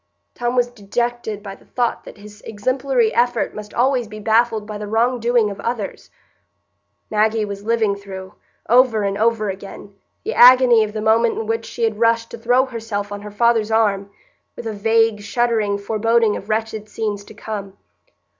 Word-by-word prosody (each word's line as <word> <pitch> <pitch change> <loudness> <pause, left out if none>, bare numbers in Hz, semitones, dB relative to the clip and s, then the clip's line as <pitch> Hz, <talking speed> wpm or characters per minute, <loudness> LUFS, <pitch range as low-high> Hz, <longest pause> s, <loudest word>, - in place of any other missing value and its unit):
Tom 240 0 -2
was 245 -1 +3
dejected 230 0 -3
by 195 -2 -7
the - - -18
thought 240 -2 -2
that - - -11
his 210 +1 -14
exemplary 250 +2 0
effort 240 -1 +1
must 210 0 -8
always 250 -1 +1
be 215 0 -9
baffled 220 0 +2
by 210 0 -7
the 210 - -5
wrong 235 +4 +1
doing 235 -2 +2
of 200 - -9
others; 230 -3 -4 1.0
Maggie 215 0 +2
was 200 0 -7
living 220 -3 +1
through, 190 -1 -9 0.3
over 240 -3 +4
and 200 0 -1
over 215 -1 +1
again, 200 +1 -10 0.3
the 440 - -3
agony 245 -2 +7
of 210 -1 -5
the 215 - -3
moment 225 +1 +2
in 225 - -3
which 225 +1 -2
she 235 - -5
had 220 -2 0
rushed 230 0 +2
to 235 - -8
throw 245 +3 +3
herself 220 -5 -5
on 205 0 -6
her 210 - -8
father's 225 +1 +2
arm, 205 -3 +1 0.5
with - - -8
a 220 - -3
vague, 225 0 +2
shuddering 215 -1 0
foreboding 220 +1 +1
of 205 - -8
wretched 220 -1 -2
scenes 210 -2 -3
to 220 - -14
come. 200 -2 -7
220 Hz, 180 wpm, -20 LUFS, 205-235 Hz, 1.0 s, agony